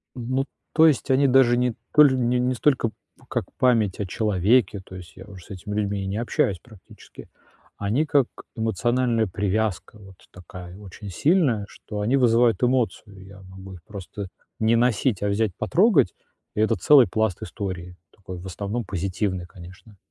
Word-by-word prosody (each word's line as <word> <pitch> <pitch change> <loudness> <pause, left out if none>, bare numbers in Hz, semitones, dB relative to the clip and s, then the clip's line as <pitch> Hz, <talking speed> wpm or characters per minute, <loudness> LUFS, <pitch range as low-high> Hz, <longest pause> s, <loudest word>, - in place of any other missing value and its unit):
Ну, 130 +2 -2 0.3
то 160 0 +6
есть 150 -3 +1
они 135 +1 +4
даже 125 -2 +4
не 125 -1 +1 0.2
толь 145 -3 +6
не 125 -1 +1
не 125 +1 +1
столько 125 -3 +1 0.4
как - - -2
память 115 -7 +2
о 100 - -1
человеке, 105 +2 +1
то 95 - -12
есть 85 -3 -11
я 95 - -11
уже 95 -4 -13
с - - -21
этими 100 +1 -7
людьми 100 -2 -2
не 95 +2 -3
общаюсь 100 -5 0
практически, 110 -1 -16 0.5
они 110 +10 0
как 140 -4 +2 0.3
эмоциональная 115 +1 0
привязка, 100 +2 -2
вот 95 -2 -14 0.2
такая 90 0 -11
очень 100 0 -10
сильная, 130 - +1
что 105 0 -8
они 115 +6 +1
вызывают 120 -2 +3
эмоцию, 115 -6 -1
я 95 0 -14
могу 95 +1 -11
их 85 -3 -13
просто 100 +1 -8 0.3
не 110 +1 +3
носить, 120 -2 +1
а - - +1
взять, 105 +1 0
потрогать, 180 - +3 0.4
и 105 - 0
это 110 +1 +2
целый 130 - +6
пласт 110 0 -1
истории, 90 -5 -6 0.2
такой 95 -2 -9
в 90 - -11
основном 100 +5 -4
позитивный, 95 0 -3
конечно. 90 +4 -14
105 Hz, 165 wpm, -24 LUFS, 95-120 Hz, 0.5 s, то